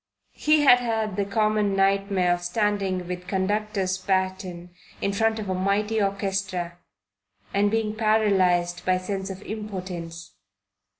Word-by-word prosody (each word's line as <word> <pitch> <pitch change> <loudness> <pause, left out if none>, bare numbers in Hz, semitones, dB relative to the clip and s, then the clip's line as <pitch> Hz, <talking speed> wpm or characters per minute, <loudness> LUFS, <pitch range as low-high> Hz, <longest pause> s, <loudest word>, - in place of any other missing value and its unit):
He 305 0 +3
had 250 -4 +7
had 220 -4 -1
the 200 - 0
common 210 0 +1
nightmare 195 -2 +2
of 175 - -3
standing 190 -1 -1
with 180 0 -6
conductor's 195 -1 -1
baton 185 -2 -2 0.3
in 200 - -1
front 225 +1 +1
of 215 -2 -5
a 190 - -1
mighty 205 +4 0
orchestra 195 -3 -2 0.7
and 205 +1 +3
being 220 0 0
paralyzed 190 -5 +2
by 185 0 +2
sense 190 +1 -4
of 190 +1 -7
impotence. 185 -6 -6
195 Hz, 130 wpm, -25 LUFS, 185-210 Hz, 0.7 s, had